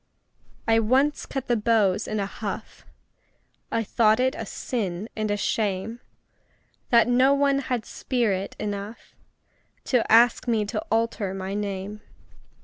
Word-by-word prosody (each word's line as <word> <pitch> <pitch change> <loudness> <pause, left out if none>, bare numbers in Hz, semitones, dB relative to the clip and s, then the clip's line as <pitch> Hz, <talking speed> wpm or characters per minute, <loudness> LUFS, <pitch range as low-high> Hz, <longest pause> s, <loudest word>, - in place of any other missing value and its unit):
I 225 0 +4
once 265 +7 +2
cut 270 -2 -4
the 240 - +2
beaux 215 -4 +3
in 215 - -2
a 200 - 0
huff 205 +1 -7 0.8
I 230 - 0
thought 215 +1 +3
it 260 +1 +2
a 225 - -6
sin 200 -5 -3
and 215 -1 -2
a 205 - 0
shame 210 +2 -1 0.9
That 235 -2 +5
no 255 +3 +4
one 280 -1 +2
had 250 -5 -2
spirit 210 -7 -1
enough 205 +1 -6 0.7
To 250 -3 +1
ask 235 +2 +5
me 220 -3 +1
to 210 - -3
alter 225 -4 0
my 190 0 -4
name. 205 0 -4
220 Hz, 140 wpm, -25 LUFS, 205-240 Hz, 0.9 s, That